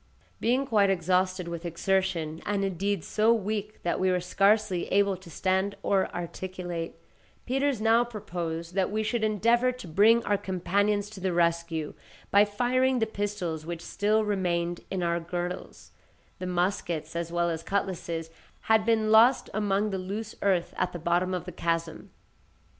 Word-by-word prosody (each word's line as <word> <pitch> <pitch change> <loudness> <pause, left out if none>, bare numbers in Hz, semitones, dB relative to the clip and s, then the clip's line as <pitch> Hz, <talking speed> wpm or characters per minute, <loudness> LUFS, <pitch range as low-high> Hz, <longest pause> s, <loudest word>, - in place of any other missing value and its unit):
Being 255 +4 +1
quite 210 -6 +3
exhausted 185 0 +1
with 170 0 -5
exertion, 170 -2 -1
and 200 -1 0
indeed, 195 -1 -1
so 220 +1 +2
weak 215 -1 -2
that 175 - 0
we 185 - +2
were 180 0 +2
scarcely 195 +1 +2
able 200 0 +3
to 180 -1 -14
stand 190 +4 0
or 195 -1 +2
articulate, 175 -1 -5 0.5
Peters 270 -1 0
now 225 +2 +4
proposed 170 -7 -5
that 190 -1 +1
we 215 +1 -1
should 225 +1 -1
endeavour 230 +4 +3
to 250 -7 -10
bring 215 +8 +5
our 205 -1 +1
companions 200 +2 0
to 210 - -9
the 185 0 -1
rescue 170 -2 0 0.4
by 200 +1 +6
firing 250 +5 +1
the 225 - +2
pistols 200 -7 -3
which 170 +1 -6
still 215 +3 +1
remained 175 -4 -1
in 190 -2 -2
our 170 0 +1
girdles—the 175 +1 -7
muskets 175 -3 -1
as 170 0 -3
well 170 0 +1
as 160 -1 -3
cutlasses 170 -4 -3 0.3
had 220 -1 +3
been 220 -1 +2
lost 235 +4 +5
among 205 0 0
the 190 - -2
loose 205 +4 -5
earth 185 -4 +1
at - - -1
the - - -4
bottom 175 +2 +1
of 180 - -4
the 180 - -6
chasm. 165 -1 -2
190 Hz, 160 wpm, -28 LUFS, 175-210 Hz, 0.5 s, by